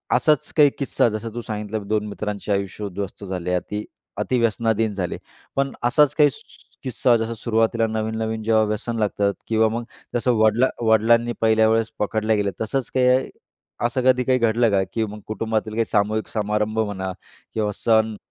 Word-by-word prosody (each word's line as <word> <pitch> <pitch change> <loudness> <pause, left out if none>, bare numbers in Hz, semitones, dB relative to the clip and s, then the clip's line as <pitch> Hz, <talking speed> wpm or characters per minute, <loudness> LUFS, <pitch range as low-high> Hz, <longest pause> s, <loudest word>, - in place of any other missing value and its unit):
असाच 150 -3 +2
काही 145 -1 +7
किस्सा 135 -3 +2
जसं 110 +1 -5
तू 120 - -4
सांगितलं 105 -1 -5
2 105 0 0
मित्रांचे 105 0 -4
आयुष्य 100 +1 -2
उध्वस्त 100 +1 -6
झाले 90 -1 -3
अति 105 +4 -3 0.3
अति 130 - 0
व्यसनाधीन 115 -1 +1
झाले. 95 -3 -3 0.4
पण 135 0 +1
असाच 145 +4 +3
काही 150 -1 +5
सु 220 - -10 0.4
किस्सा 125 -1 +2
जसं 115 +1 -2
सुरुवातीला 115 0 +1
नवीन, 110 0 -2
नवीन 110 0 -2
जेव्हा 110 0 +3
व्यसन 110 +2 -2
लागतात 100 -1 +1
किंवा 110 0 +3
मग 115 +2 -3 0.3
जसं 120 +1 +2
वडला 110 +3 +4 0.2
वडिलांनी 115 +2 +4
पहिल्या 110 0 +4
वेळेस 115 0 +1
पकडल्या 110 +1 +1
गेल्या 100 -1 0
तसंच 125 +4 -2
काही 130 0 +3 0.6
असं 120 +2 0
कधी 125 -1 +4
काही 130 0 +2
घडलं 115 0 +3
का 100 -1 +3
की 115 -1 0
मग 105 0 -8
कुटुंबातील 110 0 -2
काही 115 0 +1
सामूहिक 105 +1 0
समारंभ 105 0 -1
म्हणा 95 -3 -2 0.4
किंवा 105 -2 0
सण 110 -1 +2
110 Hz, 170 wpm, -22 LUFS, 105-115 Hz, 0.6 s, काही